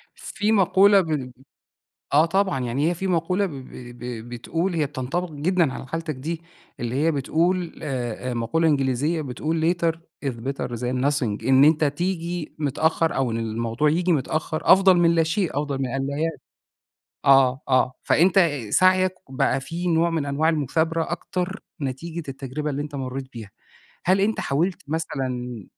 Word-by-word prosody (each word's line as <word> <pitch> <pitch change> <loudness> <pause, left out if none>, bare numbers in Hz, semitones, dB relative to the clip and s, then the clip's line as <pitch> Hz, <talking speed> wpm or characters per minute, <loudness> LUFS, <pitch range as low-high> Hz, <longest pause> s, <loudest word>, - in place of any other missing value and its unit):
في 210 +1 -2
مقولة 195 0 +5
ب 150 -7 -3 0.8
آه 155 +3 +6
طبعًا، 190 -2 +1
يعني 130 +6 0
هي - - 0
في 190 +3 -3
مقولة 180 +3 +1
ب 185 - -5
ب 135 -3 -9 0.3
ب 120 -1 -6
بتقول 165 +9 -2
هي 155 -2 +1
بتنطبق 145 +6 -3
جدًا 155 -1 +1
على - - -7
حالتك 165 +1 -4
دي، 160 +5 -5 0.4
اللي 120 +1 -3
هي 160 +4 +2
بتقول 170 +5 0
آآ، 125 -3 -3
مقولة 120 +8 +1
إنجليزية 145 +2 +1
بتقول: 160 +5 0
"later 170 -1 +1 0.3
is 135 - +1
better 130 +4 -4
than 125 +2 -1
nothing." 130 -8 -1
إن 135 +1 +6
أنت 155 +1 +4
تيجي 170 +2 -2
متأخّر، 160 +3 +1
أو 130 -3 0
إن 115 - -2
الموضوع 115 +5 0
ييجي 175 +3 +1
متأخّر 155 +2 -1
أفضل 190 -1 +6
من 170 -1 +4
لا 165 - +4
شيء، 170 +2 0
أفضل 145 -2 -2
من 130 - 0
أن 135 +2 -2
لا 140 0 -3
يأتي. 160 +1 -2 0.8
آه، 135 -1 +5
آه، 130 -1 +3
فأنت 175 +1 +4 0.2
سعيك 185 - +4
بقى 135 0 0
في 170 +6 -5
نوع 170 0 +2
من 160 -3 -1
أنواع 145 +3 +1
المثابرة 160 +2 0
أكتر، 180 +2 -3 0.2
نتيجة 160 +6 -4
التجربة 135 +3 -4
اللي 140 +1 -2
أنت 145 -1 -8
مريت 130 0 -4
بيها. 110 -4 -9 0.5
هل 190 +2 +3
أنت 215 +2 +1
حاولت 170 +7 -1
مثلًا 125 - -3
155 Hz, 165 wpm, -24 LUFS, 130-170 Hz, 0.8 s, آه